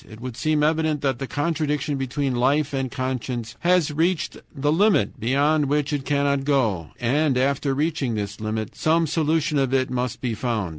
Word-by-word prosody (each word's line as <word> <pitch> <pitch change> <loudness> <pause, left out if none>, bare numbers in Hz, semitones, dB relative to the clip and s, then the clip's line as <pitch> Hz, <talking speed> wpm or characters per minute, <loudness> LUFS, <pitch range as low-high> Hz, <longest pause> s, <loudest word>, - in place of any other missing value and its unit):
It 110 - -11
would 125 -1 -6
seem 155 +3 +1
evident 155 -1 +1
that 135 -4 0
the 135 - -4
contradiction 150 -1 -1
between 135 0 -2
life 140 +4 +1
and 135 -1 -1
conscience 125 -2 -4
had 180 -2 +3
reached 170 +2 0 0.2
the 145 +2 +1
limit 190 - +2
beyond 145 +6 +2
which 145 +1 0
it 140 -2 -2
cannot 140 -1 +1
go, 115 - +1
and 135 +3 +1
after 135 +1 +1
reaching 145 -5 -1
this 105 +1 -4
limit 110 -1 -3
some 165 +1 +2
solution 155 -1 +1
of 135 -1 +1
it 130 -1 +1
must 125 -2 -2
be 120 -3 -2
found. 110 -4 -2
140 Hz, 180 wpm, -23 LUFS, 125-150 Hz, 0.2 s, had